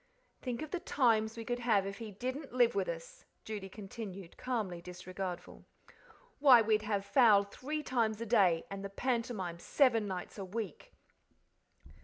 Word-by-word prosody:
"Think 250 +2 -3
of 310 - -8
the 360 - -1
times 225 -7 +2
we 230 - -6
could 245 0 -2
have 220 -5 +2
if 195 +2 -6
he 225 -2 -6
didn't 255 +8 -5
live 240 -1 +5
with 195 -3 0
us," 165 -1 -7 0.2
Judy 205 -3 -5
continued, 195 -3 -8
calmly 210 -9 -3
disregardful. 180 +1 -6 0.8
"Why, 270 -4 +8
we'd 215 -1 +3
have 205 -2 -1
fowl 210 -2 +6
three 290 +9 -5
times 225 -5 0
a 230 - -3
day, 195 -8 +3
and 195 0 -5
the 200 - -4
pantomime 230 -6 -2
seven 230 -2 +3
nights 185 +2 -5
a - - -3
week." 200 -3 -6
215 Hz, 160 wpm, -33 LUFS, 195-245 Hz, 0.8 s, Why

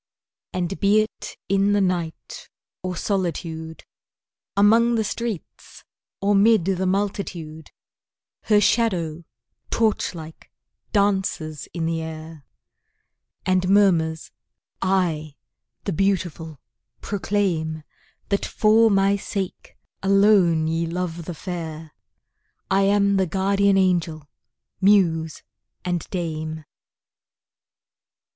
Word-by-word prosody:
And 180 +1 -3
be 200 +2 +4
it 215 - -6
in 195 +1 +2
the 205 - +3
night, 175 -4 -3 0.3
or 185 0 -4
solitude, 165 -4 -3 0.7
Among 230 +4 +5
the 220 - +1
streets 220 -3 -6 0.4
or 200 +1 +2
'mid 205 -2 +4
the 190 -1 0
multitude, 185 -5 -3 0.8
Her 210 -2 +4
shadow, 175 -8 +1 0.4
torch 220 -5 0
like, 160 -1 -11 0.4
dances 190 -7 0
in 170 -2 -3
the 165 0 -1
air, 160 -2 -8 1.0
And 185 0 +1
murmurs, 170 -6 +2 0.5
"I, 170 -6 0 0.5
the 195 - -2
Beautiful 170 -5 -1 0.4
proclaim 180 -6 -1 0.5
That 200 -1 0
for 225 +1 +4
my 195 0 +3
sake, 195 -1 -5 0.2
alone 195 -5 +4
ye 165 +1 -1
love 170 -1 -4
the 175 - -6
Fair; 160 -3 -6 0.8
I 195 +1 +4
am 200 0 +3
the 190 -1 +2
Guardian 195 +2 +2
Angel, 170 -5 +1 0.5
Muse 170 -6 +3 0.4
and 175 -2 -2
Dame!" 160 -3 -4
185 Hz, 95 wpm, -23 LUFS, 160-200 Hz, 1.0 s, Among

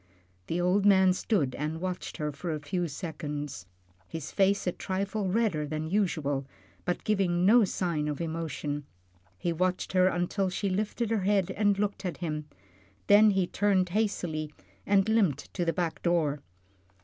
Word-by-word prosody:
The 170 - -1
old 180 +3 +2
man 190 -2 +6
stood 175 - 0
and 155 +4 -3
watched 185 0 -4
her 150 -1 -2
for 160 +4 -5
a 155 - -2
few 170 +4 -2
seconds, 145 - -5 0.4
his 160 -2 -6
face 200 0 +2
a 180 - +1
trifle 195 +3 -2
redder 185 -8 +1
than 155 +2 -4
usual, 150 -9 0 0.4
but 180 - -1
giving 185 -5 +1
no 220 +5 +7
other 230 - +6
sign 170 -5 -1
of 150 -1 -3
emotion. 160 -3 -3 0.5
He 170 - -1
watched 185 +3 -1
her 185 0 +5
until 185 +2 0
she 195 +2 -2
lifted 210 +4 -1
her 220 -3 +1
head 195 -1 +2
and 205 -1 +2
looked 205 -1 -1
at 175 -6 -3
him, 150 -1 -4 0.6
then 210 +1 +7
he 195 -2 +2
turned 190 -1 +1
hastily 170 -7 -1 0.4
and 195 0 +4
limped 195 - +1
to 180 - -1
the 165 - +2
back 170 0 -2
door. 155 -5 +1
180 Hz, 165 wpm, -29 LUFS, 155-200 Hz, 0.6 s, no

